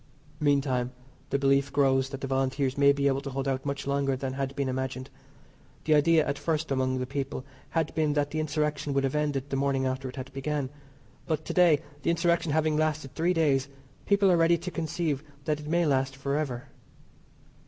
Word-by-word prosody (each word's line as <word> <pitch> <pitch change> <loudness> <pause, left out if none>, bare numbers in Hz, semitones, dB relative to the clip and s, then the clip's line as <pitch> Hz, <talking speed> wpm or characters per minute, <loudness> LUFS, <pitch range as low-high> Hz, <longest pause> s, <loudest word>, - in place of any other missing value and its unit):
Meantime 135 -4 +1 0.4
the 140 - +1
belief 140 0 +2
grows 135 -2 +2
that 135 0 -7
the - - -2
Volunteers 135 0 0
may 140 0 +6
be 140 0 0
able 135 -1 +2
to 140 - -5
hold 135 +1 -3
out 135 +1 -1
much 140 0 -3
longer 140 -1 +1
than 130 0 -4
had 135 0 -3
been 140 -1 -1
imagined. 130 0 -3 0.7
The 155 - +4
idea 155 +1 +4
at 140 0 -2
first 160 -2 -1
among 130 -1 +1
the 125 - -2
people 135 0 -4 0.2
had 165 -2 -1
been 155 -2 +1
that 145 -1 0
the 155 - -2
insurrection 150 -2 -1
would 135 - +2
be - - -6
ended 145 -2 -2
the 135 - 0
morning 135 -1 +1
after 130 0 -2
it 125 - -10
had 135 0 -7
began. 135 0 -2 0.6
But 155 -2 -1
to - - -3
day, 170 -5 +5 0.2
the - - 0
insurrection 170 -1 +2
having 155 0 +2
lasted 155 -3 -1
three 170 +4 +1
days, 140 -4 +2 0.4
people 200 -1 +4
are 175 - +4
ready 165 +1 +4
to 175 +2 -6
conceive 160 -3 -2 0.2
that 150 -1 0
it 150 - -9
may 170 +2 +2
last 135 -2 +1
for 140 +1 -2
ever. 135 -3 -3
140 Hz, 205 wpm, -28 LUFS, 135-155 Hz, 0.7 s, may